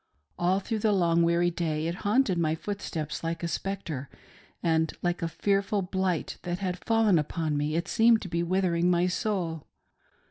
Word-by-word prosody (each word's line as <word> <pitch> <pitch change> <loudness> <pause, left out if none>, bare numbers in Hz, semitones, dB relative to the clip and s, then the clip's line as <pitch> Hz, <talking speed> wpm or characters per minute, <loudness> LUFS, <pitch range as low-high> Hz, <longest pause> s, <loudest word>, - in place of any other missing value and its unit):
All 180 +2 +2
through 220 +3 -3
the 210 0 +2
long, 170 -3 +3
weary 170 +1 +3
day 160 -2 -2
it 170 - -1
haunted 205 -3 +2
my 160 -1 +1
footsteps 165 -5 -4
like 165 0 -3
a - - 0
spectre, 165 -7 -4 0.5
and 160 -1 +2
like 175 0 0
a 165 - 0
fearful 200 +3 0
blight 185 -2 -2
that 175 0 -3
had 180 -2 -4
fallen 225 -6 +3
upon 155 0 -2
me 150 +1 -1
it 170 0 -1
seemed 225 0 +4
to - - -5
be 170 -1 -1
withering 175 -1 +1
my 175 0 +3
soul. 180 -4 -2
175 Hz, 175 wpm, -28 LUFS, 165-195 Hz, 0.5 s, seemed